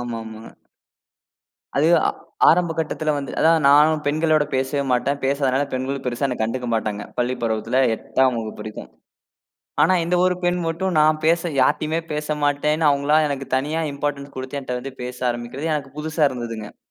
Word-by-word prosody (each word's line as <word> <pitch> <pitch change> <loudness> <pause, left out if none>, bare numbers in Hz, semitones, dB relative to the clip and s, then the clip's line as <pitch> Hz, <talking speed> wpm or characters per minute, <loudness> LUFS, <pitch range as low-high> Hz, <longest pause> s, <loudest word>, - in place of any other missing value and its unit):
ஆமாமா. 115 -2 -6 1.3
அது, 150 +3 +3 0.2
ஆ - - +3 0.4
ஆரம்ப 170 0 +3
கட்டத்துல 155 -1 -1
வந்து 140 - -5
அதான் 160 -1 +4
நானும் 150 +2 +5
பெண்களோட 155 0 +2
பேசவே 135 +2 0
மாட்டேன். 140 +3 +1
பேசாதனால, 135 0 +1
பெண்களும் 130 +1 -3
பெருசா 125 +2 -1
என்ன 125 - -2
கண்டுக்க 120 +3 -2
மாட்டாங்க. 105 -2 -2
பள்ளிப் 125 0 -1
பருவத்துல, 110 +3 0 0.2
8ஆம் 130 +1 +1
வகுப்பு 110 -1 -7
வரைக்கும். 110 - -8 0.9
ஆனா 185 - +4
இந்த 175 - 0
ஒரு 180 0 +3
பெண் 175 0 +2
மட்டும் 180 +3 -2
நான் 155 0 +4
பேச 165 +1 +3 0.2
யார்டயுமே 155 +5 +2
பேச 150 0 -2
மாட்டேன்னு 150 +2 +1
அவுங்களா 140 +1 +3
எனக்குத் 135 -2 -3
தனியா 150 +5 -1
இம்பார்டண்ஸ் 140 0 -4
குடுத்து 130 +2 -5
என்ட்ட 125 -2 -4
வந்து 135 +1 -7
பேச 125 0 -6
ஆரம்பிக்கிறது, 120 +6 -4
எனக்கு 140 -1 -5
புதுசா 155 +1 -2
இருந்ததுங்க. 115 -4 -6
140 Hz, 155 wpm, -22 LUFS, 125-155 Hz, 1.3 s, நானும்